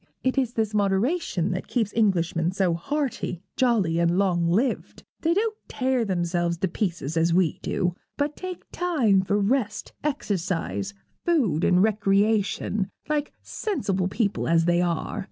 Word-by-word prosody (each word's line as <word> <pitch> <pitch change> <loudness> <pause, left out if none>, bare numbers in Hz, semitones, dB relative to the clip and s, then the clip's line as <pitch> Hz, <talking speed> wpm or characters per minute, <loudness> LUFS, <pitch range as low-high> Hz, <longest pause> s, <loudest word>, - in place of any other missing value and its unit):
It 260 - +1
is 255 -3 0
this 220 -2 -1
moderation 200 - +1
that 185 +1 -3
keeps 225 -4 -1
Englishmen 175 -6 +2
so 185 -3 +2
hearty, 235 - -2
jolly, 210 -10 +2
and 170 +1 +2
long 180 -4 +2
lived. 225 +10 0 0.2
They 335 +1 +2
don't 435 +2 +1
tear 255 -3 0
themselves 175 -2 0
to 190 - 0
pieces 170 - -2
as 165 +1 +3
we 180 -4 +2
do, 180 -2 -1 0.2
but 290 +1 -1
take 370 -1 -6
time 265 - +2
for 200 +2 0
rest, 215 +1 0
exercise, 165 - -2 0.3
food, 230 - +2
and 180 +1 +4
recreation, 205 -1 +1 0.2
like 300 -1 0
sensible 195 - -1
people 205 +1 -1
as 165 0 +3
they 175 0 +3
are. 170 -2 -1
195 Hz, 145 wpm, -25 LUFS, 175-250 Hz, 0.3 s, and